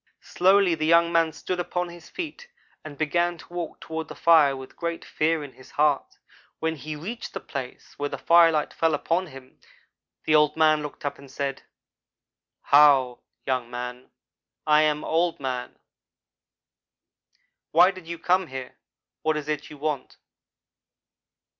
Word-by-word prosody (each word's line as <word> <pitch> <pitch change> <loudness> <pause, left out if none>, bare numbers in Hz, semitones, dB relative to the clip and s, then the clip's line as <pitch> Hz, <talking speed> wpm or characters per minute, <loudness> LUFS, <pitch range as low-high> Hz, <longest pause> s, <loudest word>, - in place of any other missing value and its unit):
"Slowly 190 0 +3
the 155 -1 -1
young 170 +1 +5
man 165 -1 +3
stood 180 +3 -4
upon 175 0 -2
his 170 -1 -13
feet 360 +8 -7 0.4
and 145 -2 -9
began 170 +3 0
to 160 +3 -15
walk 175 -2 -5
toward 160 -1 -5
the 150 - -9
fire 150 -3 +5
with 130 0 -11
great 170 -1 -4
fear 160 0 0
in 140 - -9
his 130 - -17
heart. 150 -2 +1 0.4
When 160 0 -2
he 155 +1 -7
had 150 +1 -9
reached 230 +6 -6
the - - -2
place 130 -3 -8
where 145 0 -2
the - - -5
firelight 165 -3 +4
fell 165 -2 +1
upon 170 +5 -1
him, 135 -3 -14 0.7
the 155 - +2
Old 150 0 +4
man 155 -1 +4
looked 150 0 -8
up 145 - -3
and 140 -1 -14
said: 135 0 -4 1.0
"'How, 140 -4 +5 0.3
young 130 -3 -1
man, 125 +1 -7 0.6
I 150 0 +5
am 150 -1 +1
Old 170 +1 0
man. 130 -2 -4 1.9
Why 175 +4 +6
did 185 -3 -13
you 170 0 -5
come 180 +2 +1
here? 130 -2 -8 0.4
What 155 -1 0
is 150 -1 -5
it 150 -1 -3
you 150 - -11
want?' 145 -2 -4
155 Hz, 160 wpm, -25 LUFS, 140-170 Hz, 1.9 s, Why